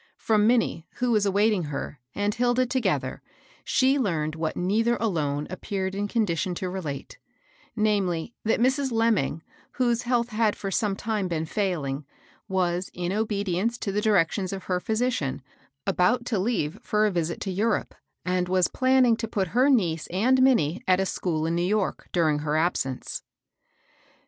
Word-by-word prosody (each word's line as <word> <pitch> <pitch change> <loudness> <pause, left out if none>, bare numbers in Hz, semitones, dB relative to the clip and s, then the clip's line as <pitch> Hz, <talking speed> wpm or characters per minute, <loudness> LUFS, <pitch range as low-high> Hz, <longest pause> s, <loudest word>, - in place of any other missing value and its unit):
Erom 215 -1 +3
Minnie, 230 -8 +1
who 245 0 0
was 210 -3 +3
awaiting 200 -2 +2
her, 145 -1 -5 0.2
and 205 +1 0
Hilda 245 +2 +2
together, 255 +1 -1 0.4
she 270 +2 +3
learned 160 - 0
what 160 0 -3
neither 220 +6 +2
alone 150 -10 -1
appeared 190 0 -3
in 205 +1 -2
condition 190 -5 0
to 185 +1 -3
re*' 190 - -3
late; 145 - -6 0.6
namely, 205 -3 0
that 220 - +1
Mrs. 265 +2 +2
Lemming, 220 -10 +1 0.3
whose 240 -2 +1
health 240 -1 0
had 215 -1 +1
for 195 - -5
some 200 +1 0
time 210 -2 -2
been 165 -2 -2
failing, 155 -7 -2 0.4
was, 185 -2 0
in 175 0 -2
obedience 210 0 -1
to 200 - -3
the 205 +2 0
directions 195 -2 +2
of 195 -2 -5
her 180 -1 -1
physician, 195 - -1 0.4
about 200 +6 +2
to 225 -5 0
leave 185 -7 -1
for 210 0 +1
a 210 - +2
visit 170 -2 -2
to 195 - -2
Europe, 210 +4 0 0.3
and 180 -1 0
was 185 -1 +3
planning 255 -2 +4
to 225 0 -3
put 195 -5 -1
her 255 +7 +3
niece 175 - +2
and 245 +9 +2
Minnie 185 - +3
at 185 0 +4
a 195 - +1
school 160 -4 -1
in 165 - 0
New 170 - 0
York, 200 +2 -1
during 155 -4 +2
her 150 +1 -1
absence. 155 -6 -1
195 Hz, 165 wpm, -26 LUFS, 175-230 Hz, 0.6 s, planning